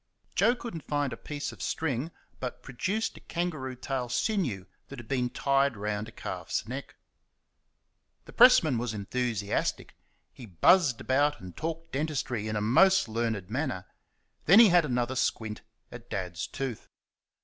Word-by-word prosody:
Joe 240 - +3
could 240 -1 -7
n't 165 -3 -8
find 145 -3 0
a - - -4
piece 145 +4 -5
of - - -12
string, 145 -2 -2 0.3
but 125 -1 -6
produced 195 - -2
a - - -11
kangaroo 155 -7 -3
tail 130 -1 -3
sinew 130 - -1 0.2
that 140 - -9
had 120 -2 -10
been 125 -1 0
tied 140 -1 +1
round 105 +1 -3
a - - -10
calf's - - -4
neck. - - -6 1.3
The - - -13
pressman 165 - +6
was 120 -2 -3
enthusiastic. 105 -1 -2 0.4
He 125 - -11
buzzed 130 - +4
about 145 +3 +2
and 90 -2 -10
talked 165 +1 -5
dentistry 130 -6 -2
in 110 - -2
a 105 - 0
most 190 - +5
learned 110 -4 -2
manner. 130 - -2 0.6
Then 195 +8 +8
he 230 -3 +9
had 175 -2 +5
another 125 -1 -1
squint 110 -3 -1 0.3
at - - -11
Dad's 90 -3 -4
tooth. 130 -5 -5
130 Hz, 155 wpm, -29 LUFS, 110-155 Hz, 1.3 s, he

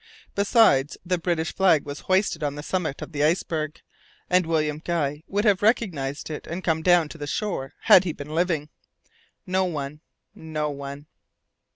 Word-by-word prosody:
Besides, 200 - +3
the 180 0 0
British 170 -1 -1
flag 185 -6 +3
was 145 0 -6
hoisted 185 -3 +1
on 145 -1 -1
the 145 - -7
summit 165 -5 -2
of - - -9
the 145 -2 -1
iceberg, 155 -1 0 0.5
and 180 -2 +3
William 155 -2 0
Guy 150 -4 -1
would 205 +2 -1
have 200 -3 +4
recognized 160 - 0
it 150 - -6
and 175 +3 -5
come 160 -2 +1
down 175 -1 +4
to 165 - -10
the 145 - -5
shore 145 -5 -3
had 185 - +7
he 180 - -2
been 150 0 -8
living. 165 -3 0 0.8
No 185 +1 +1
one. 150 -3 -4 0.3
No 155 -2 -3
one. 140 0 -7
160 Hz, 170 wpm, -25 LUFS, 145-180 Hz, 0.8 s, had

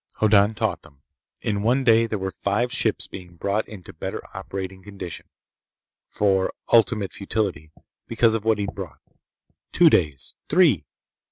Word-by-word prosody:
Hoddan 105 0 +4
taught - - -1
them. 70 -1 -20 0.4
In 100 -1 -1
one 125 +5 +2
day 115 -2 +5
there 110 - -2
were 95 0 -3
five 110 +5 0
ships - - +1
being 90 -2 -11
brought 100 +5 -1
into 95 -5 -11
better - - -5 0.2
operating 95 -1 -6
condition—for 95 +1 -4 0.2
ultimate 115 -4 +3
futility—because 100 +3 -2
of 115 -2 -1
what 110 -1 +2
he'd 100 -1 -3
brought. - - -7 0.7
Two - - +6
days. 75 -3 +1 0.2
Three. 155 - +4
100 Hz, 135 wpm, -24 LUFS, 95-110 Hz, 0.7 s, Two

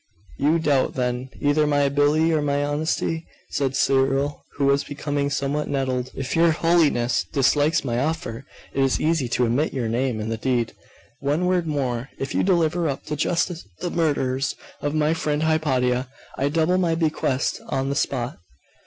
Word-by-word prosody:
'You 150 +4 +3
doubt, 145 -5 +1
then, 125 0 -2
either 145 +1 +2
my 145 -1 +2
ability 145 +3 +3
or 155 - +2
my 145 0 0
honesty?' 160 +2 -1 0.2
said 135 -2 -1
Cyril, 135 +2 +1
who 140 - 0
was 140 0 +3
becoming 145 0 -2
somewhat 145 +2 -1
nettled. 130 -2 -1
'If 135 -1 -3
your 165 +1 +5
Holiness 155 -8 +2
dislikes 145 +3 +2
my 120 -2 0
offer, 135 -5 -2 0.3
it 135 - +2
is 135 - +2
easy 155 -5 +1
to 125 +1 +2
omit 130 +7 0
your 125 -4 -1
name 120 0 0
in 110 +1 -3
the 115 - -2
deed. 120 -1 0 0.5
One 145 +6 0
word 180 -2 +1
more. 130 -4 -2
If 135 - -4
you - - +2
deliver 170 -3 +2
up 135 - -4
to 150 - -3
justice 170 - -1
the 175 - -2
murderers 135 -5 0 0.3
of 145 +1 -1
my 155 +1 +2
friend 150 -2 -1
Hypatia, 130 -5 +1 0.3
I 140 +2 0
double 165 +4 +2
my 170 -3 +2
bequest 155 -5 0
on 135 +1 -1
the 140 - -1
spot. 125 -5 -2
145 Hz, 170 wpm, -23 LUFS, 130-160 Hz, 0.5 s, your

